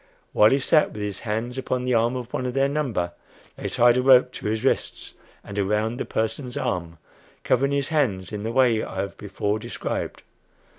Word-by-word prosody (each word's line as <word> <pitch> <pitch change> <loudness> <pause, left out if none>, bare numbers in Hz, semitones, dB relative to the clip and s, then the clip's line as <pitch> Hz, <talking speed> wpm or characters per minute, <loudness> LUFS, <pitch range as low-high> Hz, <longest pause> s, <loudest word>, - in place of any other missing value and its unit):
While 105 - +6
he 135 - +3
sat 150 +3 +3
with 105 - -5
his 100 -1 -4
hands 120 +3 -3
upon 130 -1 -2
the 125 - +1
arm 115 +2 +2
of 125 -1 -6
one 130 - -1
of 125 - -4
their 135 0 +3
number, 130 -12 -1 0.4
they - - -4
tied 120 0 +4
a - - +3
rope 125 -1 +6
to - - -6
his 110 +2 -1
wrists, - - -1 0.3
and 100 0 -5
around 105 +4 0
the - - -3
person's 115 +3 -2
arm, 85 -2 -3 0.5
covering 140 +2 +2
his 140 -1 0
hands 110 - 0
in 105 -1 -4
the 110 +2 -3
way 120 -3 +3
I - - -7
have 100 - -5
before 105 +1 -2
described. - - -4
120 Hz, 200 wpm, -24 LUFS, 105-130 Hz, 0.5 s, While